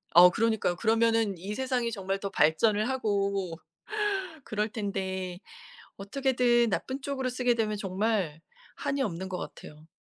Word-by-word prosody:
어 180 +1 +10
그러니까요. 220 -4 +1
그러면 225 -1 +2
이 195 +5 -5
세상이 250 -1 -1
정말 195 -2 -2
더 200 - -3
발전을 210 +8 +3
하고 200 -8 -1 0.9
그럴 215 0 -1
텐데 190 -4 -3 0.6
어떻게든 240 +2 +2
나쁜 265 +6 -2
쪽으로 265 -2 -2
쓰게 250 -1 +1
되면 215 -2 0
정말 195 -5 -1 0.4
한이 275 0 -2
없는 190 -5 -2
것 180 - -3
같아요. 150 +1 -10
210 Hz, 290 characters per minute, -29 LUFS, 190-235 Hz, 0.9 s, 어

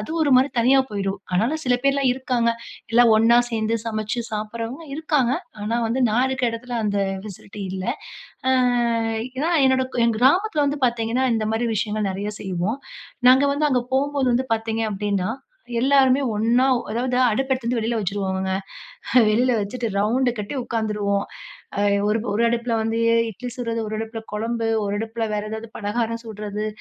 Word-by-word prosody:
அது 210 - -7
ஒரு 290 - +2
மாதிரி 265 +2 +4
தனியா 255 +4 +5
போயிடும். 200 -1 -2
ஆனாலும் 235 +13 +1
சில 250 -1 +3
பேர்லாம் 275 -1 +2
இருக்காங்க. 250 -2 0 0.4
எல்லாம் 235 -1 +6
ஒண்ணா 230 +2 +5
சேர்ந்து 225 0 0
சமைச்சு 220 +1 -2
சாப்பிடறவங்க 230 +7 -5
இருக்காங்க. 295 -5 +1 0.3
ஆனா 225 +3 -1
வந்து 235 +4 -1
நான் 245 +4 +2
இருக்கிற 260 -2 0
இடத்தில 240 +1 -5
அந்த 205 -1 0 0.3
ஃபெசிலிட்டி 205 0 -9
இல்ல. 190 0 -4 0.6
அ - - +4 0.9
ஏன்னா, 310 +5 0 0.2
என்னோட 260 0 +3 0.2
என் 230 -2 +1
கிராமத்தில 305 - +3
வந்து 285 +1 -2
பார்த்தீங்கன்னா, 235 +2 0
இந்த 215 -1 -1
மாதிரி 230 +2 0
விஷயங்கள் 210 -1 -1
நிறைய 200 +2 -3
செய்வோம். 190 +5 -2 0.5
நாங்க 260 +2 +5
வந்து 300 +1 +1
அங்கே 250 -2 +1
போம்போது 275 -1 +1
வந்து 260 +2 0
பார்த்தீங்க 225 0 -2
அப்படின்னா 200 -1 -1 0.5
எல்லாருமே 270 +1 +4
ஒண்ணா 235 +4 +3 0.3
அதாவது 245 +3 -1 0.2
அடுப்பு 265 +4 0
எடுத்து 255 -3 -2
வந்து 245 0 0
வெளியில 225 +1 -1
வச்சுருவோங்கங்க. 190 -1 -2 0.8
வெளியில 245 +4 +3
வச்சுட்டு 230 +4 -3
ரவுண்டு 245 +5 +2
கட்டி 210 +6 -4
உட்காந்துருவோம். 210 -3 -1 0.5
அ - - +2 0.3
ஒரு 215 - +2
ஒரு 215 +3 +1
அடுப்புல 235 0 -1
வந்து 225 +1 -1 0.3
இட்லி 245 +4 -7
சுடுறது, 230 -2 -2
ஒரு 215 0 -4
அடுப்புல 225 0 -5
குழம்பு, 225 +2 -2 0.2
ஒரு 200 - -2
அடுப்புல 225 +1 -3
வேற 210 - -1
ஏதாவது 220 +1 -6
பலகாரம் 230 +2 -2
சுடுறது. 210 -1 -5
230 Hz, 160 wpm, -22 LUFS, 210-255 Hz, 0.9 s, எல்லாம்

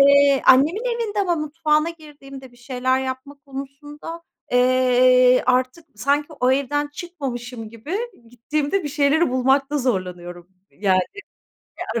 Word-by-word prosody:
Eee, 280 -1 +5
annemin 310 - +5
evinde 465 -4 -2
ama 355 -3 +1
mutfağına 305 +1 0
girdiğimde 275 -5 -13
bir 245 - -20
şeyler 255 +1 -1
yapma 260 +2 -6
konusunda, 290 +4 -9 0.3
eee, 255 0 +4
artık 255 +6 0
sanki 285 +6 0
o 250 +1 +3
evden 280 +2 0
çıkmamışım 255 - -7
gibi 260 - -5 0.3
gittiğimde 290 - -2
bir - - -2
şeyleri 290 +2 +2
bulmakta 270 +3 +1
zorlanıyorum, 180 -7 -4 0.2
yani, 190 -2 +1 0.7
eee, 230 +1 -4
275 Hz, 120 wpm, -21 LUFS, 250-300 Hz, 0.7 s, Eee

